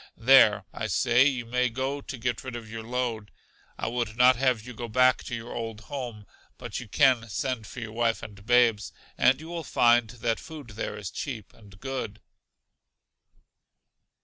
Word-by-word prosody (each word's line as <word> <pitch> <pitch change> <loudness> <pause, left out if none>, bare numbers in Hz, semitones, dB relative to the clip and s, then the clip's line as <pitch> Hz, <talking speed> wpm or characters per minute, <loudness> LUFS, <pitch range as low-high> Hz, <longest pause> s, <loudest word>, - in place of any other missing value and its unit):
There, - - +6
I - - -3
say, 125 +2 +4
you 130 -4 -1
may 125 +2 +1
go 130 +4 -3
to 135 - -7
get 120 +1 -2
rid 130 -2 -6
of 115 -2 -7
your 115 +1 -6
load. 115 -2 -3 0.5
I - - -4
would 115 -1 -3
not 125 +1 +6
have 125 -3 +1
you 125 - -8
go 120 +1 -6
back 125 +3 +3
to 120 - -4
your 115 +1 -7
old 115 -2 -5
home, 120 -6 -6 0.3
but - - -5
you 125 - -9
can 120 0 +3
send 115 +1 -3
for 125 - -8
your 110 -2 -6
wife 115 0 0
and 100 -1 -10
babes, 115 -3 +3 0.2
and 130 +2 +4
you 160 - -10
will 170 -1 -4
find 120 -4 +3
that 115 -1 -2
food 150 -6 -10
there 105 0 -5
is 105 -3 -6
cheap 115 -8 -6
and 100 -3 -17
good. 130 -5 -5
120 Hz, 180 wpm, -27 LUFS, 110-130 Hz, 0.5 s, There